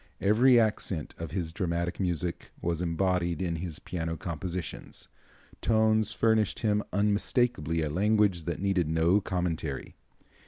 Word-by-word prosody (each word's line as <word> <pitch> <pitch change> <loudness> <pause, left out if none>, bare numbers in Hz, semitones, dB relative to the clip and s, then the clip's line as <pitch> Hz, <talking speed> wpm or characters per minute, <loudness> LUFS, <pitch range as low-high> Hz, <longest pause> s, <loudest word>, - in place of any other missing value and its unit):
Every 120 +5 +5
accent 105 -7 0
of 85 -1 -4
his 80 -1 -3
dramatic 85 -2 -2
music 90 -2 -2
was 85 0 -2
embodied 85 -1 0
in 85 -3 -1
his 80 -2 -5
piano 80 -2 -4
compositions. 85 +1 -5 0.5
Tones 110 -1 +3
furnished 110 -2 +1
him 105 -2 +2
unmistakably 100 - +1
a 75 - -1
language 100 -1 +2
that 85 - -3
needed 95 -5 +1
no 80 +5 +3
commentary. 80 -7 -3
90 Hz, 125 wpm, -29 LUFS, 85-105 Hz, 0.5 s, Every